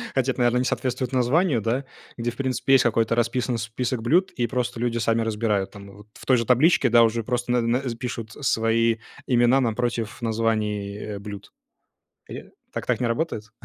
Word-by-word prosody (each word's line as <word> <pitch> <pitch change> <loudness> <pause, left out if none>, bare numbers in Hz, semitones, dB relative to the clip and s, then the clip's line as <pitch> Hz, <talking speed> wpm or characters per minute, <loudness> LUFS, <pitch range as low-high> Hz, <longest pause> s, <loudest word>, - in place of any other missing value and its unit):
хотя - - +2
это, - - -7
наверно, 120 0 +3
не 125 - +1
соответствует 130 0 -2
названию, 130 +2 +2
да, 120 +6 -1 0.3
где, 120 0 -2
в - - -16
принципе, 135 0 0
есть 135 - +6
какой-то 115 0 +1
расписан 120 +1 0
список 115 +2 -3
блюд, 170 - +2
и 120 -1 -1
просто 125 -1 -2
люди 120 0 -1
сами 115 0 +1
разбирают. 105 -3 -1
Там 100 -1 -12
вот 105 0 -15
в - - -14
той 130 -2 +4
же 115 - -1
табличке, 130 +2 +4
да, 115 0 +6
уже 115 0 +1
просто 120 +1 -2
на 125 0 +3
на 115 +2 +1 0.2
пишут 115 -2 -5
свои 115 -3 +1 0.3
имена 125 +1 +4
напротив 115 -1 -2
названий, 110 -3 -1
э, 105 -1 -6
блюд. 100 -1 -9 0.8
Я - - -7 0.3
так - - -5
так - - 0
не 125 - 0
работает? 115 -4 -3
120 Hz, 190 wpm, -24 LUFS, 115-125 Hz, 0.8 s, есть